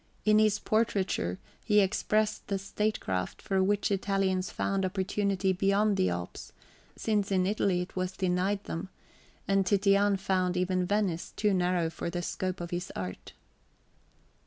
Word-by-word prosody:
In 215 0 +5
his 215 -1 +3
portraiture 195 - 0 0.3
he 210 -1 +4
expressed 215 +2 +1
the 200 - 0
statecraft 195 - -2
for 195 -3 0
which 205 +1 +1
Italians 195 -1 0
found 195 -1 -1
opportunity 190 0 0
beyond 200 +3 +2
the 95 - +2
Alps, 85 0 -6 0.4
since 205 -3 0
in 185 -1 +2
Italy 195 -2 +1
it 180 - -7
was 185 0 -3
denied 190 +2 0
them; 175 +3 -5 0.6
and 195 0 +3
Titian 200 +1 +3
found 185 -1 0
even 180 0 0
Venice 195 -4 -1
too 210 -2 +2
narrow 180 -2 +1
for 165 - -4
the 175 0 -3
scope 185 0 -3
of 170 - -6
his 175 +1 -3
art. 90 -1 -6
190 Hz, 145 wpm, -29 LUFS, 180-205 Hz, 0.6 s, In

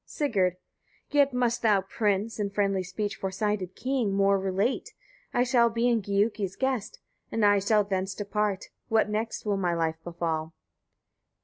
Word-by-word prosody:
Sigurd. 200 - 0 0.6
14. 290 - +2
Yet 280 -1 +5
must 245 -1 0
thou, 210 -4 +4
prince! 205 +2 -1
in 205 -1 0
friendly 195 -1 0
speech, 195 +3 -3
foresighted 190 -1 -2
king! 255 -7 -1
more 195 0 +3
relate. 195 +6 -1 0.4
I 245 - +2
shall 240 -2 +4
be 235 +1 +1
Giuki's 200 -1 0
guest, 260 -5 -2 0.3
and 225 -2 +2
I 205 0 +5
shall 210 +1 +3
thence 190 -1 -2
depart: 205 -1 -2 0.2
what 225 -1 +4
will 210 - -6
next 225 +1 -3
my 195 -4 0
life 160 -1 -1
befall? 165 -2 -3
205 Hz, 150 wpm, -27 LUFS, 190-225 Hz, 0.6 s, Yet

